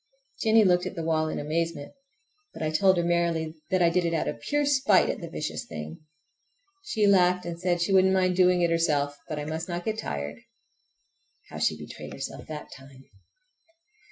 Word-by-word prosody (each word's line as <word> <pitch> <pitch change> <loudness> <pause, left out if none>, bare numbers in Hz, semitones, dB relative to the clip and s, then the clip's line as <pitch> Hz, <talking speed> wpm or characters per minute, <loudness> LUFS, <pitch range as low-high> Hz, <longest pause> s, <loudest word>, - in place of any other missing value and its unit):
Jennie 220 -1 +5
looked 180 -1 +3
at 185 - -7
the 165 - -4
wall 160 -1 +1
in - - -4
amazement, 160 0 -3 0.6
but - - -5
I 155 - 0
told 190 +3 +4
her 175 - +1
merrily 165 -2 -1
that 185 -2 +2
I 170 - +4
did 180 +1 +1
it 170 -1 0
out 160 - -1
of - - -4
pure 290 0 0
spite 265 -8 +3
at - - -7
the 170 - -6
vicious 155 -1 -4
thing. 80 -1 -7 0.8
She 220 - 0
laughed 180 -2 +4
and 170 -1 -5
said 175 -1 0
she 195 - 0
wouldn't 190 0 +5
mind 185 -1 +2
doing 180 -1 +4
it 170 - +2
herself, 145 -4 +1
but 155 - -3
I 150 - -4
must 160 +3 -4
not 175 0 -4
get 220 0 -2
tired. 70 - -5 1.1
How - - -7
she - - +1
betrayed - - -9
herself - - -7
that 150 -1 -8
time! 135 -1 -14
170 Hz, 195 wpm, -27 LUFS, 155-185 Hz, 1.1 s, Jennie